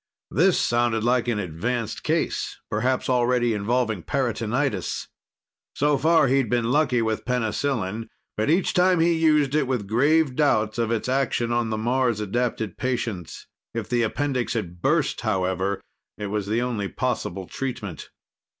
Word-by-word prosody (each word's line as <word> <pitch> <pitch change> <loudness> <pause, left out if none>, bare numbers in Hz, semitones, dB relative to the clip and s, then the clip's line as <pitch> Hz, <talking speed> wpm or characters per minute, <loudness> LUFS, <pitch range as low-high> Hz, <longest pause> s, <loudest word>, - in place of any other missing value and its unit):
This 175 - +3
sounded 120 -2 +1
like 125 +1 +2
an 120 -3 +1
advanced 105 +6 -3
case, - - -1
perhaps 130 0 0
already 120 -1 +2
involving 110 -1 0
peritonitis. 120 - -1 0.7
So 145 +1 +2
far, 160 -1 +4
he'd 135 -3 +2
been 120 0 +1
lucky 130 -5 +2
with 110 -1 -1
penicillin, 115 -3 -1 0.3
but 110 +5 0
each 175 +4 +2
time 180 -1 +4
he 170 +1 +4
used 150 -4 +3
it 150 -3 +2
with 125 -6 -1
grave 140 +6 +2
doubts 110 -7 +2
of 115 -1 +1
its 115 0 -1
action 125 -3 0
on 120 -1 +1
the 110 - -1
Mars 120 0 +1
adapted 110 -1 -2
patients. 115 -9 -3 0.3
If 115 -3 -3
the 120 -1 +2
appendix 130 +2 -1
had 90 -6 -4
burst, 150 - +1
however, 95 -3 0 0.4
it 105 - -4
was 105 -2 -2
the 115 +3 +1
only 115 -5 -2
possible 95 +1 -3
treatment. 115 - -5
120 Hz, 150 wpm, -24 LUFS, 110-135 Hz, 0.7 s, far